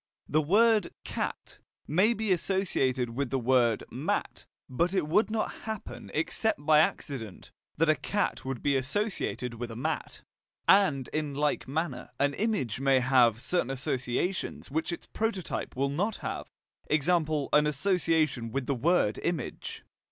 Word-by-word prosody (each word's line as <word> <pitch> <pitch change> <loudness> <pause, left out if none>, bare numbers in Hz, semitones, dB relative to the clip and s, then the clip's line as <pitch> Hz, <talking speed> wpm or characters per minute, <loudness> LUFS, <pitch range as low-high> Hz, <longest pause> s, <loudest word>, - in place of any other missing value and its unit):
The 155 - +2
word 210 +5 +3
"cat" - - -5 0.3
may 195 +10 +3
be 220 -2 -1
associated 145 -10 +1
with 135 +2 -2
the 135 - 0
word 120 -3 +2
"mat," - - -3 0.2
but 170 +9 0
it 180 -6 +1
would 210 +9 +3
not 220 0 -1
happen 220 -2 -6
except 160 +1 0
by 155 0 +6
accident 130 - -2 0.3
that 165 +2 +3
a 155 - +6
cat 205 +6 -2
would 130 -2 -5
be 140 -1 +2
associated 135 - -1
with 120 +1 -5
a 115 - -7
mat. 120 - -3 0.4
And 155 -10 +4
in 150 -2 -2
like 150 +1 0
manner 140 -2 -3
an 140 +1 +2
image 195 - -1
may 135 -1 +4
have 125 -3 +4
certain 175 -8 0
associations 135 +6 -2
which 160 +4 -1
its 170 - -6
prototype 220 -5 -3
will 135 +2 +1
not 200 +10 -1
have, - - -5 0.4
e.g. 155 0 +2
an 155 -3 +2
association 155 - +1
with 135 +2 -2
the 140 - 0
word 135 -5 +2
"image." 170 -7 -4
150 Hz, 150 wpm, -29 LUFS, 130-180 Hz, 0.4 s, by